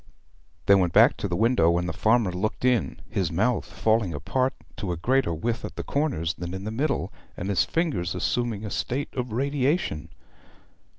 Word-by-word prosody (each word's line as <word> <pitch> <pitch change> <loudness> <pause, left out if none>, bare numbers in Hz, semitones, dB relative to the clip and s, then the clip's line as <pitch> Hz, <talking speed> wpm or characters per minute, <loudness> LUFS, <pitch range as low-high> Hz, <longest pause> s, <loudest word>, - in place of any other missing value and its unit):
They 100 - +6
went 90 -3 +3
back - - +6
to - - -2
the - - -2
window, 95 -8 +3
and 85 0 -1
the 80 - -3
farmer 110 -1 +2
looked 105 +7 -2
in, 120 - +1
his 95 -4 -1
mouth 110 +8 +1
falling 110 -7 0
apart 130 - 0 0.2
to 100 -3 -3
a 85 - -2
greater 130 +4 +1
width 115 +9 -2
at - - -6
the - - -4
corners 135 - -1
than 90 +1 -6
in 95 - -6
the 110 - -4
middle, 140 +6 -1 0.2
and 95 - -4
his 100 - +2
fingers 145 - -1
assuming 115 -4 -1
a 105 - -5
state 135 +4 -2
of 125 -2 -3
radiation. 135 - 0
110 Hz, 185 wpm, -26 LUFS, 85-125 Hz, 0.2 s, They